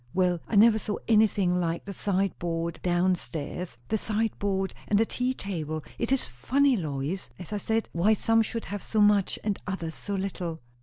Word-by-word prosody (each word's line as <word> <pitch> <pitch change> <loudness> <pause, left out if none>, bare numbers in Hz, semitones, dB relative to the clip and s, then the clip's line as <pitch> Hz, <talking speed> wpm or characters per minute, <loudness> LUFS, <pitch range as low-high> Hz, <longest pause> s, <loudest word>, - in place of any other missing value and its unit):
"Well 180 -2 +2
I - - -2
never 220 +1 +7
saw 210 0 -2
anything 205 -5 +4
like 170 -1 -1
the 200 - -5
sideboard 175 -4 -1
down 180 +1 +2
stairs; 155 0 -5
the 220 - +1
sideboard 205 -3 -1
and 205 - +3
the 225 - +4
tea 250 +3 -1
table. 155 -7 -4 0.2
It 235 - -1
is 270 - +2
funny, 260 - +2
Lois, 155 0 -3
as 180 +3 -8
I - - 0
said, 220 +2 0
why 185 +6 +3
some 225 +2 +3
should 225 +1 -3
have 205 -1 -5
so 220 - -1
much, 205 -2 +4
and 205 -2 -1
others 170 -4 -3
so 200 +4 -4
little." 180 -4 -3
195 Hz, 185 wpm, -28 LUFS, 170-215 Hz, 0.2 s, never